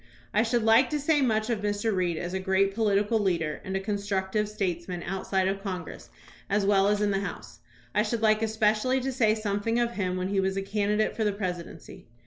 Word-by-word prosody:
I 210 - +4
should 235 0 +1
like 225 +3 +5
to 300 - -1
say 290 +1 +2
much 220 -2 +1
of 220 -3 -1
Mr. 205 +1 -1
Reed 175 -3 0
as 175 +2 -4
a 190 - -1
great 190 +1 +1
political 210 0 +2
leader 170 -6 -1
and 190 0 -3
constructive 205 0 -1
statesman 180 -4 -3
outside 190 0 -1
of 195 +1 -2
Congress, 185 -3 -6 0.4
as 200 0 +1
well 195 -1 +4
as 210 0 +1
in 205 -1 +2
the 195 - +1
House. 200 - -7 0.3
I 210 - +3
should 225 +1 -2
like 215 0 +4
especially 220 +3 +1
to 265 +1 -2
say 225 -4 +2
something 215 +2 -1
of 235 0 +1
him 185 -5 -2
when 185 +1 -2
he 200 -1 +1
was 190 0 0
a 195 - -1
candidate 210 +1 0
for 225 - -1
the 210 - +2
presidency. 180 -5 -6
205 Hz, 210 wpm, -27 LUFS, 190-220 Hz, 0.4 s, like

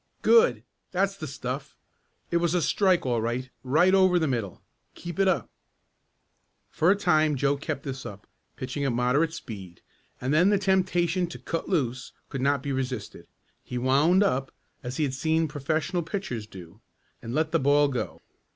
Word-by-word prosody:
"Good! 175 - +5 0.3
That's 195 +2 0
the 155 -5 -6
stuff. 130 +1 -6 0.5
It 170 - +3
was 170 0 +1
a 175 - +2
strike 185 -6 +2
all 120 -3 +1
right 125 +3 -3
right 160 +8 +3
over 185 -2 +5
the 160 -2 +1
middle. 115 -9 -3 0.3
Keep 175 +1 -7
it 195 - +4
up." 170 - +1 1.2
For 165 - +2
a 195 - +6
time 155 -6 +2
Joe 140 +1 +1
kept 145 -1 -4
this 135 -1 -5
up, 105 0 -9 0.3
pitching 130 +2 -4
at 135 -3 +1
moderate 125 +7 +2
speed, 100 - -9 0.4
and 130 +3 -1
then 175 +5 +5
the 205 - +4
temptation 185 -2 +1
to 170 - -8
"cut 165 - -4
loose" 130 -8 -1 0.2
could 135 - -4
not 140 0 +1
be 140 - -3
resisted. 130 -4 -4 0.4
He 125 - -5
"wound 145 +10 +4
up" 135 -8 0 0.3
as 125 -1 -5
he 155 - +1
had 135 -3 -1
seen 160 +4 +1
professional 155 +5 -1
pitchers 165 - -4
do 95 +1 -13 0.4
and 115 +2 -5
let 155 0 +1
the 165 - +2
ball 145 +1 +4
go. 130 -3 -4
145 Hz, 175 wpm, -26 LUFS, 125-175 Hz, 1.2 s, a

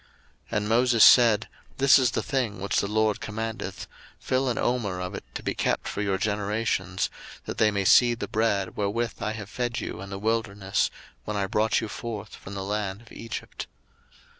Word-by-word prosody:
02:016:032 - - -1
And 105 0 -1
Moses 120 0 +4
said, 115 -4 +7 0.3
This 135 +1 +6
is 130 -2 +3
the - - -2
thing 125 -8 -1
which 100 +1 0
the - - 0
LORD 110 0 +1
commandeth, 110 -3 -5 0.3
Fill 130 0 0
an 120 - -1
omer 110 -7 0
of 90 +2 -4
it 100 - -6
to - - -5
be - - -1
kept - - -1
for 100 - -3
your 100 -2 0
generations; 100 -2 -1 0.3
that - - -5
they 110 - +5
may 100 -2 -1
see 120 +4 +6
the - - -5
bread 110 -4 0
wherewith 110 +4 -2
I 110 - -1
have 105 -3 -7
fed 120 +2 -2
you - - -5
in 100 - -8
the 100 - -5
wilderness, 105 -2 0 0.4
when 105 -1 -3
I 100 - +1
brought 105 +3 +1
you 110 - -3
forth 110 -2 -6
from 95 - -10
the 95 - -4
land 100 0 -3
of 115 - -18
Egypt. 115 0 -7
105 Hz, 195 wpm, -26 LUFS, 100-115 Hz, 0.4 s, said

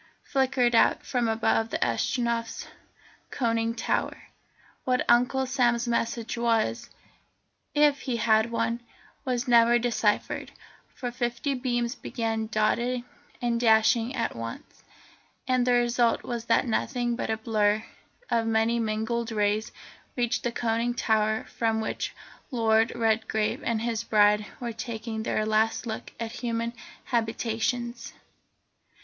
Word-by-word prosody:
flickered 260 -3 +1
out 230 - +4
from 245 -3 0
above 225 0 +1
the - - -1
Astronef's 230 - -1 0.6
conning 230 -2 0
tower. 225 - -1 0.7
What 255 -1 +1
Uncle 250 +2 +3
Sam's 245 -2 +1
message 230 -1 -1
was, 220 - 0 0.9
if 295 -1 +4
he 250 -3 -2
had 220 0 +3
one, 230 0 -1 0.5
was 250 0 -1
never 235 0 +6
deciphered, 230 -3 0 0.5
for 245 -1 -4
fifty 240 +3 -2
beams 240 -2 -1
began 225 -4 -3
dotting 235 +3 0 0.4
and 235 -1 +1
dashing 230 +2 +3
at 235 - -2
once, 115 0 -8 0.7
and 255 -1 +2
the 250 - +4
result 240 -1 +2
was 235 -1 -4
that 230 - +3
nothing 240 0 -1
but 235 - -3
a 220 - 0
blur 215 -1 +1 0.5
of 230 -1 +2
many 225 +1 +2
mingled 225 +1 -1
rays 210 0 0 0.4
reached 240 -2 0
the 240 - -1
conning 235 +1 -1
tower 220 -1 +1
from 225 -1 -1
which 220 - -3 0.3
Lord 225 -3 +2
Redgrave 220 -1 0
and 230 -1 -1
his 230 -1 -1
bride 210 -1 +3
were 235 -2 -4
taking 220 0 -5
their 215 -1 -1
last 220 +2 +1
look 220 -1 -5
at 230 -1 -4
human 235 -1 -3 0.3
habitations. 235 +1 -2
230 Hz, 125 wpm, -27 LUFS, 220-240 Hz, 0.9 s, never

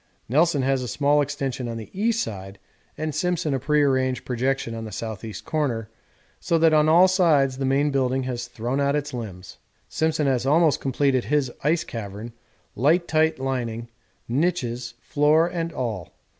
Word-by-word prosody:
Nelson 150 +2 +2
has 135 0 +1
a 125 - -4
small 145 +5 +2
extension 135 -3 -3
on 115 -1 -4
the 110 - -9
east 225 +4 +1
side 95 -2 -7 0.4
and 155 0 -3
Simpson 175 -2 0
a 135 - 0
prearranged 135 -2 +1
projection 130 -1 -1
on 115 0 -5
the - - -6
S.E. 110 0 -6
corner, 120 -8 -2 0.5
so 170 - +1
that 165 -1 +4
on 155 0 +4
all 175 +4 +7
sides 150 -8 +3
the 135 - -1
main 140 +2 +2
building 130 -1 0
has 125 -2 -4
thrown 120 +4 -3
out 145 0 0
limbs. 95 -7 -8 0.3
Simpson 160 -1 0
has 130 -3 +1
almost 155 +3 +3
completed 135 -1 +1
his 145 -4 +1
ice 155 +3 +2
cavern, 110 +1 -7 0.4
light 160 - +2
tight 160 0 +2
lining, 120 -3 -3 0.4
niches, 125 -4 -1
floor 150 +3 +3
and 170 -1 -3
all. 110 - -4
135 Hz, 160 wpm, -24 LUFS, 120-155 Hz, 0.5 s, all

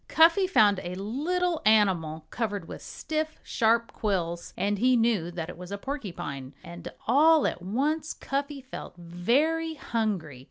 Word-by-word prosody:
Cuffy 340 +4 +5
found 210 - +4
a 175 +1 -5
little 315 - -1
animal 185 -8 +3
covered 205 -7 -3
with - - -8
stiff, 315 0 -4
sharp 230 +1 +1
quills 175 -5 -2
and 200 +1 0
he 250 +2 +4
knew 225 -7 +2
that 170 -2 -5
it 175 -1 -9
was 180 +1 -9
a 200 - -3
porcupine. 175 - -6
And 170 0 -8
all 305 +6 +5
at - - -1
once 290 - -1
Cuffy 280 +1 -3
felt 260 -7 -9
very 275 - 0
hungry. 205 - -2
220 Hz, 150 wpm, -27 LUFS, 180-290 Hz, -, Cuffy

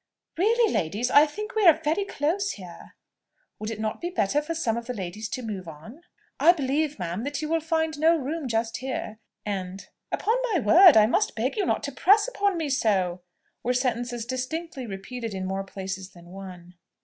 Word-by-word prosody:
"Really, 445 +5 +3
ladies, 210 +10 -1
I 295 +2 +7
think 425 +9 -6
we 440 - +1
are 320 -2 +7
very 320 +5 0
close 380 +5 -1
here:" 180 -4 -12 0.6
"Would 215 - -4
it 225 -2 -5
not 215 0 -3
be 345 - -2
better 295 - +1
for 330 +2 -4
some 235 -9 0
of 235 0 -5
the 250 - -4
ladies 205 +2 -5
to 255 - -4
move 200 -5 -5
on?" 165 - -11 0.4
"I 345 - +7
believe, 295 0 -1
ma'am, 180 +3 -4
that 285 +1 -3
you - - -2
will 330 0 +2
find 320 -1 -1
no 325 +2 +5
room 300 +1 -3
just 225 -1 -1
here:" 255 -4 -5 0.3
and, 190 -2 -4 0.2
"Upon 450 +3 +1 0.2
my 360 - +3
word 330 - +7
I 215 - +7
must 405 - +1
beg 240 +5 -1
you 410 -4 0
not - - 0
to 285 - -3
press 410 - +4
upon 405 -6 0
me 320 -2 -2
so!" 190 -9 +1 0.4
were 250 +1 0
sentences 245 -2 -1
distinctly 260 +2 -4
repeated 220 +2 -6
in 190 0 -3
more 195 +1 -2
places 190 -1 -6
than 175 -1 -15
one. 180 -2 -10
250 Hz, 195 wpm, -26 LUFS, 200-320 Hz, 0.6 s, I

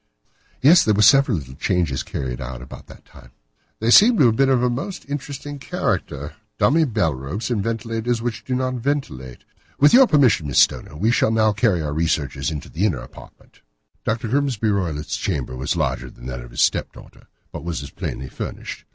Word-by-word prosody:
"Yes, 165 +5 +7
there 110 - +2
were 105 - +3
several 135 -2 +5
little 65 -4 -8
changes 80 -3 -1
carried 65 -2 -5
out 60 0 -6
about 65 - -12
that - - -15
time." - - -17 0.5
"They 115 +2 +1
seem 225 - +7
to 140 - +5
have 115 -2 +3
been 135 +2 +3
of 125 -2 +2
a 125 - +3
most 175 +10 -5
interesting 145 0 -6
character—dummy 110 - -1
bell 105 - 0
ropes, 70 - -5
and 110 -4 0
ventilators 115 +1 -2
which 115 -1 -4
do 130 - -2
not 130 0 -1
ventilate. 115 - -4 0.4
With 145 - +5
your 260 +1 +8
permission, 125 - +3
Miss 70 - -2
Stoner, - - +2
we 110 +8 +2
shall 120 - +2
now 110 -1 +2
carry 100 -6 +1
our 75 -1 -3
researches 75 -2 -1
into 75 -2 -6
the 85 - -4
inner 95 -10 +1
apartment." - - -15 0.4
Dr. 115 +2 -2
Grimesby 125 -5 0
Roylott's 85 -7 -2
chamber 70 -9 -3
was 65 +1 -2
larger - - -2
than - - -15
that 60 -1 -5
of - - -11
his - - -3
step - - +1
daughter, - - -16 0.2
but - - -7
was 85 -3 -4
as 70 - -9
plainly 65 - -5
furnished. - - -7
110 Hz, 195 wpm, -21 LUFS, -, 0.5 s, your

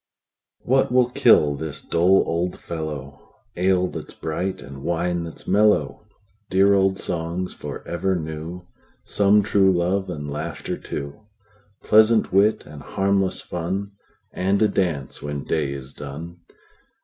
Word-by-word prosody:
What 130 0 +2
will 125 -1 +3
kill 75 -10 +5
this 75 +1 -5
dull 90 +3 +4
old 85 +2 -2
fellow? 75 -4 -6 0.3
Ale 90 0 +2
that - - -7
's - - -12
bright, 90 +4 -3
and 70 0 -10
wine 85 +2 -1
that 80 - -9
's - - -11
mellow! 105 +1 +2 0.4
Dear 95 +1 +4
old 95 -1 +3
songs 85 +1 -3
for - - -8
ever 90 +3 0
new; 80 +2 -6 0.4
Some 105 +1 +3
true 100 -2 +4
love, 95 +2 0
and 75 -4 -5
laughter 75 +2 -4
too; 70 +9 -7 0.6
Pleasant 110 0 +4
wit, 105 +3 +3
and 75 -1 -11
harmless 95 -1 0
fun, 95 +4 -4 0.4
And 95 +2 +1
a - - +5
dance 85 -9 -2
when 75 -1 -4
day 75 -4 -1
is 70 0 -7
done. 80 +5 -8
90 Hz, 140 wpm, -23 LUFS, 80-95 Hz, 0.6 s, kill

